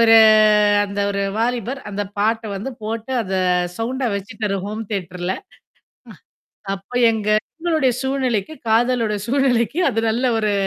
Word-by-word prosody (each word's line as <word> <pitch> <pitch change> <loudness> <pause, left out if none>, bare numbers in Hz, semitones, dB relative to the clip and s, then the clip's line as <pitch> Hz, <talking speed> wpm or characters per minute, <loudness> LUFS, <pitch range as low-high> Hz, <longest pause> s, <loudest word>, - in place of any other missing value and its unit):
ஒரு 225 -1 +7 0.7
அந்த 200 0 -4
ஒரு 200 0 -1 0.2
வாலிபர் 245 +3 -1
அந்த 205 0 -2 0.2
பாட்ட 225 +2 +1
வந்து 245 +8 -5
போட்டு, 225 +3 -4
அத 190 -3 -6 0.5
சவுண்டா 250 +2 -1
வெச்சுட்டாரு 200 0 -3
ஹோம் 215 +2 -5
தியேட்டர்ல. 180 -2 -3 1.3
ஆ, - - -1
அப்ப 195 +5 -19 0.2
எங்க 215 -1 -3 0.3
என்னோடைய 315 -7 +2
சூழ்நிலைக்கு, 265 -4 -1 0.2
காதலோட 230 -1 +2
சூழ்நிலைக்கு 255 - +1
அது 225 - -1
நல்ல 245 +4 0
ஒரு 215 -1 +1
225 Hz, 130 wpm, -20 LUFS, 205-250 Hz, 1.3 s, ஒரு